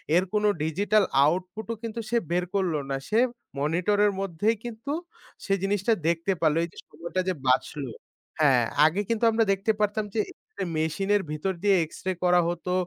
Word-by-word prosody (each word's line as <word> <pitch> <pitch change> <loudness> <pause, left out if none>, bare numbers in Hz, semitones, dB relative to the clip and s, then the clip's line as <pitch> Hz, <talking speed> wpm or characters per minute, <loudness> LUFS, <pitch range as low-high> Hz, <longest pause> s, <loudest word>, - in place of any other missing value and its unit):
এর 180 - +5
কোন 210 0 +1 0.2
digital 200 +7 +2 0.2
output 185 +7 -1
ও - - -6
কিন্তু 230 0 -4
সে 235 - +2
বের 180 +1 +2
করল 185 -4 +1 0.2
না। 135 - 0
সে 220 - +3 0.4
মনিটর 170 +8 +1
এর 205 - +3
মধ্যেই 195 +4 0
কিন্তু 240 +4 -5 0.5
সে 195 - +1
জিনিসটা 200 +3 +2
দেখতে 170 +3 +1
পারলো। 155 -1 +3
এই 170 - -3
যে - - -19
সময়টা 170 +4 -3
যে - - +1
বাচলো 130 +2 +1 0.5
হ্যাঁ, 130 -5 +5 0.2
আগে 170 +6 +2
কিন্তু 230 0 -1
আমরা 225 0 +3
দেখতে 195 +3 +1
পারতাম 210 0 0
যে - - +1 0.6
মেশিনের 195 +6 +1
ভিতর 155 +6 -2
দিয়ে 200 -1 +5
এক্সরে 185 +4 -4
করা 180 0 +5
হতো। 175 +1 -4
190 Hz, 175 wpm, -26 LUFS, 165-210 Hz, 0.6 s, এর